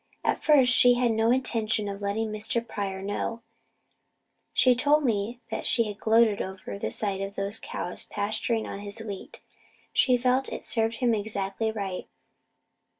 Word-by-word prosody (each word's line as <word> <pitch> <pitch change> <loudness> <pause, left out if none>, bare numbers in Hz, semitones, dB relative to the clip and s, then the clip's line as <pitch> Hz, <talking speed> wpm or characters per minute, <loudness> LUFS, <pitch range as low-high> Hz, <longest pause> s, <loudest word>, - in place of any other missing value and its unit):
At - - 0
first 270 -5 +5
she 245 -1 +6
had 245 -1 +2
no 225 +1 +2
intention 225 -4 +1
of 200 0 -5
letting 215 +2 -1
Mr. 220 +2 -2
Pryor 195 -2 -4
know. 225 +3 -3 1.1
She 255 0 +4
told 290 +5 +3
me 230 +1 -1 0.2
she 230 -1 +4
had 210 -2 -4
just - - -29
gloated 220 -2 +4
over 185 - -6
the 110 - -2
sight 195 - 0
of 195 +1 -5
those 200 +2 -1
cows 180 - -5
pasturing 215 +2 -2
on 200 - -6
his 205 +1 -5
wheat. 205 -4 -8 0.5
She 250 -2 +4
felt 255 +2 +1
it - - -6
served 225 -1 0
him 240 0 +1
exactly 205 0 -2
right. 200 -4 -4
220 Hz, 160 wpm, -27 LUFS, 200-235 Hz, 1.1 s, she